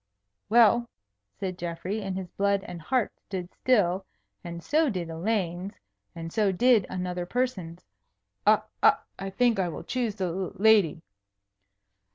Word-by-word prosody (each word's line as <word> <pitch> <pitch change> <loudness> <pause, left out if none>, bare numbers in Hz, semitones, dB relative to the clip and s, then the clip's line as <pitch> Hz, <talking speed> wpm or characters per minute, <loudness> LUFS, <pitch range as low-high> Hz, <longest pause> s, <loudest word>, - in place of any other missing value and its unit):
"Well," 235 +1 +5 0.5
said 185 -2 -5
Geoffrey, 175 +5 -3
and 195 -2 -3
his 185 -2 -6
blood 200 -1 +1
and 175 -2 -8
heart 245 +6 0
stood 185 -2 -6
still 195 -7 +2 0.4
(and 170 -1 -7
so 310 0 +2
did 175 -6 -3
Elaine's, 180 +1 -2 0.4
and 165 0 -7
so 210 -3 +2
did 230 +1 +4
another 180 -1 -3
person's), 190 -9 -2 0.6
"I - - +6 0.2
I 195 - +2
think 235 +1 +2
I 180 -2 +1
will 165 - -7
choose 240 -5 -2
the 190 - -2
l 180 +1 -3
lady." 200 -6 +4
190 Hz, 140 wpm, -27 LUFS, 175-220 Hz, 0.6 s, I